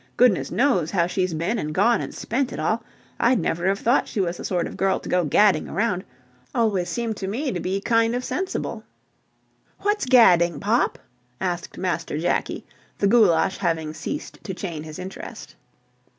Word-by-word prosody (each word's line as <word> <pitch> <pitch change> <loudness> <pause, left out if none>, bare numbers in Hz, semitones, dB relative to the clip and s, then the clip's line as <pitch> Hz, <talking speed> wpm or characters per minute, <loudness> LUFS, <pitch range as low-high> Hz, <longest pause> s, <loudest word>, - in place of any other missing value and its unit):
Goodness 240 -7 +4
knows 190 - +2
how 170 -3 +2
she's 180 -1 -1
been 185 +9 -1
and 155 -2 -4
gone 230 +5 +3
and - - -5
spent 260 +2 -2
it - - -6
all. 220 +9 0 0.4
I'd 250 +2 +4
never 175 -2 -1
have 195 +1 +2
thought 240 +6 +2
she - - -4
was 175 -2 0
the - - -8
sort 175 -3 0
of - - -7
girl 195 0 +1
to - - -10
go 180 0 +2
gadding 205 +7 +3
around. 205 -4 0 0.5
Always 200 -6 +1
seemed 225 +3 -2
to 190 - -4
me 255 +8 -2
to 180 - -3
be 185 +3 -1
kind 230 +2 +2
of 250 - -2
sensible." 375 +1 -3 1.0
"What's 415 -7 0
gadding, 175 - +5
Pop?" 220 +5 +1 0.4
asked 175 -2 -3
Master 170 -4 -2
Jakie, 170 +3 -1 0.3
the - - 0
goulash 195 -5 +4
having 165 -4 -1
ceased 175 - -6
to 190 - -5
chain 170 -5 -5
his 155 0 -8
interest. 185 +1 -8
190 Hz, 180 wpm, -23 LUFS, 175-230 Hz, 1.0 s, gadding